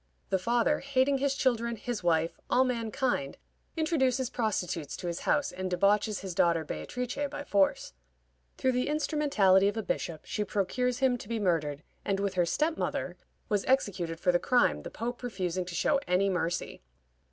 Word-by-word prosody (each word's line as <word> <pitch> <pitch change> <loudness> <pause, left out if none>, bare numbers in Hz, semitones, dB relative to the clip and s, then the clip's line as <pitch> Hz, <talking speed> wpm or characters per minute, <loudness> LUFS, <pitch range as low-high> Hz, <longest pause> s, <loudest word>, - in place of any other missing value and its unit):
The 190 - +2
father, 240 +8 +2
hating 275 0 +1
his 275 0 +1
children, 235 -3 +1
his 225 0 -4
wife, 165 -1 +1
all 255 - +4
mankind, 240 - -1 0.4
introduces 265 -6 +1
prostitutes 180 - -2
to - - -7
his 170 -1 -2
house, 290 - +2
and 185 0 -4
debauches 205 +3 +2
his 190 -2 -5
daughter 170 -1 +2
Beatrice 250 - -4
by 290 0 -6
force. 200 - +1 0.6
Through 260 - +2
the 250 +1 0
instrumentality 285 -11 +3
of 205 +2 -1
a 220 - -1
bishop 165 -5 -3
she 210 - -2
procures 235 +6 -1
him 255 -2 +2
to - - -10
be 230 -1 -1
murdered, 160 -7 0 0.2
and, 195 -1 0
with 200 -1 -1
her 175 -2 +2
step 315 - 0
mother, - - -2 0.3
was 205 -3 +1
executed 185 -10 0
for 180 - +3
the 175 - +2
crime, 250 +5 +2
the - - -7
Pope 240 +2 -5
refusing 185 -6 -2
to 175 -1 -7
show 285 - +2
any 190 +2 +2
mercy. 175 - -2
210 Hz, 175 wpm, -29 LUFS, 180-255 Hz, 0.6 s, all